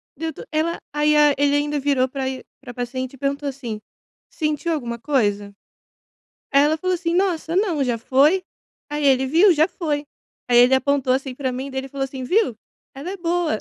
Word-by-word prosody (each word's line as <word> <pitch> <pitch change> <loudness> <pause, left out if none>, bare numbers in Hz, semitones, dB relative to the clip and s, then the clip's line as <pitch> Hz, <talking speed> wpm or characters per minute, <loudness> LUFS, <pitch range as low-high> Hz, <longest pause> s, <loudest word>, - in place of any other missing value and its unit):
Deu 325 0 -3
to - - -10
ela 320 +2 0
aí 300 0 +2
a 295 -1 +5
ele 285 +1 +2
ainda 290 0 0
virou 275 -2 +1
pra 265 0 -3
e 260 -1 -6 0.2
pra 245 -3 -9
paciente 255 +2 -4
e - - -12
perguntou 280 +2 -2
assim: 240 -6 -6 0.5
"Sentiu 305 +1 -2
alguma 235 -6 -4
coisa?". 205 -7 0 1.0
Aí 280 +1 +5
ela 310 +2 +2
falou 370 +3 -1
assim: 335 -1 -2
"Nossa, 350 -3 0
não, 360 -8 +1
já 245 -2 0
foi?", 280 +10 +3 0.5
aí 295 0 -2
ele: 265 -1 +4
"Viu, 340 +8 +5
já 315 0 +3
foi". 300 -6 -3 0.4
Aí 245 -1 +4
ele 245 +2 +6
apontou, 265 -1 +1
assim, 265 -1 -3
pra 260 -1 -2
mim 260 +2 -5
e - - -9
daí 265 0 -2
ele 270 - -9
falou 275 0 -2
assim: 265 -1 -7
"Viu, 310 - +1 0.4
ela 280 +6 -6
é 395 - -6
boa". 345 - 0
280 Hz, 205 wpm, -22 LUFS, 260-315 Hz, 1.0 s, ele